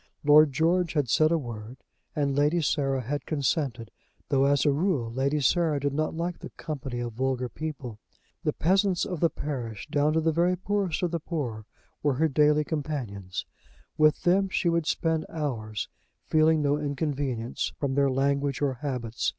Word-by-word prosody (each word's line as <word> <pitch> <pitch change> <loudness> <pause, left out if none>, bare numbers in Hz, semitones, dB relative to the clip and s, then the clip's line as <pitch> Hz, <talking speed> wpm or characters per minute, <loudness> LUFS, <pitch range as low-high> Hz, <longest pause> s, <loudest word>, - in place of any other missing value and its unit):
Lord 150 0 +7
George 170 +4 +1
had 145 -6 0
said 155 +1 +4
a 170 - +3
word, 120 -3 -7 0.4
and 140 -2 0
Lady 150 +4 +3
Sarah 135 -3 0
had 145 +4 -4
consented, 135 -5 -1 0.4
though, 135 0 +3
as 140 +1 +3
a 145 - +5
rule, 140 -7 0
Lady 140 +4 +1
Sarah 155 +2 +2
did 140 0 -1
not 155 +2 -1
like 170 +1 -3
the - - -8
company 135 -6 -5
of 120 -1 -4
vulgar 130 +1 -1
people. 135 -6 -6 0.4
The 155 - +1
peasants 190 +4 +2
of 180 -5 -4
the 170 - +3
parish, 120 -10 -5
down 150 +1 +2
to 160 - +3
the 160 0 +2
very 175 +3 +2
poorest 195 -2 -1
of 175 - +1
the 170 - -1
poor, 125 -10 -4 0.3
were 145 -3 +1
her 160 +5 +3
daily 150 +1 +3
companions. 130 - -4 0.5
With 155 0 +3
them 190 +2 +3
she 175 - +1
would 170 -2 0
spend 160 -1 0
hours, 115 -9 -3 0.4
feeling 155 0 +3
no 145 +1 +2
inconvenience 140 -5 -2
from 140 -2 -1
their 140 0 +3
language 140 +1 0
or 140 -2 +1
habits. 125 -5 -2
145 Hz, 175 wpm, -27 LUFS, 130-160 Hz, 0.5 s, Lord